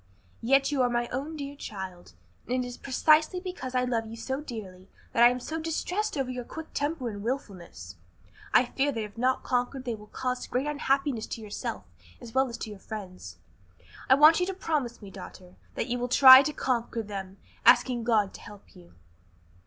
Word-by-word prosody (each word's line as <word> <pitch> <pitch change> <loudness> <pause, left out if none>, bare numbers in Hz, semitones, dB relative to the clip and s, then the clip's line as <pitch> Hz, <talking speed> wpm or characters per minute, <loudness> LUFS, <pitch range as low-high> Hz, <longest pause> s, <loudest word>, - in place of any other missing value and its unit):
"Yet 275 +4 +3
you 280 -3 +1
are 250 - +3
my 240 0 -1
own 285 +5 -4
dear 285 -1 -6
child, 190 - -8 0.4
and 250 0 0
it - - -5
is 245 - -7
precisely 310 +7 +2
because 360 -9 -6
I 250 - +2
love 235 -3 -1
you 225 +1 -9
so 265 +4 -4
dearly 195 -9 -9 0.2
that 230 - +2
I 240 - +9
am 250 +1 -2
so 315 +6 -5
distressed 350 +4 -2
over 265 -2 -1
your 250 -1 -5
quick 320 +6 -9
temper 290 -3 -2
and 205 -3 -5
wilfulness. 185 - -6 0.5
I 250 - +5
fear 275 +3 0
that 225 -4 -3
if 210 -1 -9
not 255 +2 0
conquered 255 +1 -1
they 240 - -2
will 210 -1 -10
cause 250 +2 -3
great 255 +3 -1
unhappiness 275 -4 0
to 225 - -6
yourself 200 - -5 0.4
as 230 -2 -11
well 265 0 +2
as 235 - -6
to 220 - -6
your 205 - -10
friends. 185 - -8 0.7
I 260 - +8
want 305 +4 +7
you 360 - 0
to 385 - -3
promise 285 - -2
me, 195 - -10
daughter, 185 -1 -11 0.2
that - - -1
you 245 -1 -2
will 245 +1 -2
try 260 +1 +10
to 300 - -1
conquer 235 -5 -2
them, 195 -2 -7 0.3
asking 245 -3 +4
God 215 -4 +2
to - - -11
help 205 -1 -14
you." 85 0 -17
245 Hz, 200 wpm, -28 LUFS, 215-275 Hz, 0.7 s, try